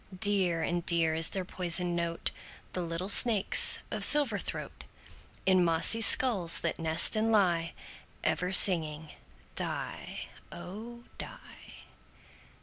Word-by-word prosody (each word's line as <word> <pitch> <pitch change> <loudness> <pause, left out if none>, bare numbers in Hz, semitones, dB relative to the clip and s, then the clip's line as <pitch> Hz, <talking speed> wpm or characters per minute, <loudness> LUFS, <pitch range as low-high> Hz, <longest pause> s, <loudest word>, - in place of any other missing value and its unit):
Dear 185 -5 -2
and 175 0 -5
dear 165 -2 -2
is 160 0 -2
their 190 -2 -7
poisoned 175 -1 -3
note, 170 -1 -6 0.4
The 180 - -5
little 170 +2 -7
snakes' 210 0 +5
of - - -3
silver 280 -9 +4
throat, - - -10 0.6
In 185 -1 0
mossy 170 +7 +2
skulls 220 -7 +2
that 170 - -6
nest 165 +5 +3
and 220 +1 -3
lie, 175 -6 -2 0.5
Ever 180 +1 -4
singing 160 -5 +1 0.4
"die, - - -8 0.3
oh! 220 +7 -13 0.2
die." - - -15
180 Hz, 120 wpm, -26 LUFS, 165-205 Hz, 0.6 s, snakes